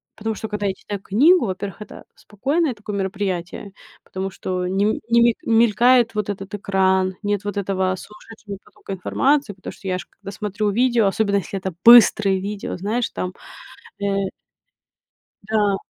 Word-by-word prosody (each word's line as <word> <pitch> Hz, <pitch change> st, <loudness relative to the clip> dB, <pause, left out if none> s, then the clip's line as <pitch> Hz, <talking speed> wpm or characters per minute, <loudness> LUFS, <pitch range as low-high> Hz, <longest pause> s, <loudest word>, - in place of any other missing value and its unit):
потому 220 Hz, +1 st, -3 dB
что 220 Hz, -, -6 dB
когда 210 Hz, -1 st, -4 dB
я 195 Hz, -, +1 dB
читаю 200 Hz, +1 st, -7 dB
книгу: 285 Hz, -, +4 dB
во-первых, 190 Hz, -1 st, -5 dB
это -, -, -13 dB
спокойное 280 Hz, -, -1 dB
такое 210 Hz, -1 st, -7 dB
мероприятие, 190 Hz, 0 st, -4 dB, 0.3 s
потому 190 Hz, 0 st, -5 dB
что 185 Hz, -1 st, -3 dB
не 200 Hz, +4 st, 0 dB
не 235 Hz, 0 st, +5 dB
мель 235 Hz, -1 st, +4 dB
мелькает 235 Hz, +1 st, +4 dB
вот 210 Hz, -1 st, -1 dB
этот 195 Hz, 0 st, -7 dB
экран, 190 Hz, -1 st, +1 dB
нет 205 Hz, -1 st, -1 dB
вот 205 Hz, 0 st, -4 dB
этого 190 Hz, -1 st, 0 dB
сумасшедшего 210 Hz, 0 st, -11 dB
потока 195 Hz, -, -9 dB
информации, 270 Hz, +6 st, +1 dB
потому 190 Hz, -, -9 dB
что 195 Hz, -, -11 dB
я 185 Hz, 0 st, -1 dB
ж -, -, -10 dB
когда 195 Hz, 0 st, -10 dB
смотрю 210 Hz, 0 st, -2 dB
видео, 235 Hz, -1 st, +2 dB
особенно 200 Hz, +1 st, +1 dB
если 195 Hz, 0 st, -2 dB
это 190 Hz, 0 st, -4 dB
быстрое 215 Hz, -5 st, +7 dB
видео, 200 Hz, -1 st, -5 dB
знаешь, 220 Hz, +6 st, -2 dB
там, 185 Hz, 0 st, -4 dB, 0.7 s
э 195 Hz, -1 st, 0 dB, 1.2 s
Да. 205 Hz, -1 st, +1 dB
205 Hz, 160 wpm, -21 LUFS, 190-220 Hz, 1.2 s, быстрое